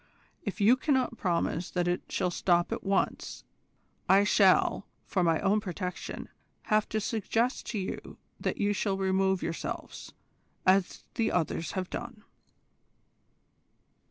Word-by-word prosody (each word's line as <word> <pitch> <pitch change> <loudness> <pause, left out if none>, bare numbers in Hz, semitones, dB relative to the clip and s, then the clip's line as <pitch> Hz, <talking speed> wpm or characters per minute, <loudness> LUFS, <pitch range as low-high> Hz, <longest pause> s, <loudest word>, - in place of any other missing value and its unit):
If 205 - -5
you 220 +5 +6
cannot 260 -4 0
promise 175 -1 0
that 175 -1 -1
it 175 0 0
shall 180 -2 0
stop 175 0 +2
at - - -3
once 195 0 -1 0.7
I 195 +2 +7
shall, 200 -1 +4 0.2
for 185 - 0
my 165 -2 +3
own 205 +2 +2
protection, 180 -2 -5 0.4
have 215 -1 +1
to 215 - 0
suggest 225 +3 -1
to 225 - -3
you 190 -2 -5 0.2
that - - -2
you 205 0 +1
shall 200 -1 0
remove 190 0 +1
yourselves, 165 - -5 0.5
as 185 0 +3
the 225 - 0
others 165 -1 -1
have 185 -2 -3
done." 240 -3 -6
195 Hz, 130 wpm, -29 LUFS, 180-215 Hz, 0.7 s, I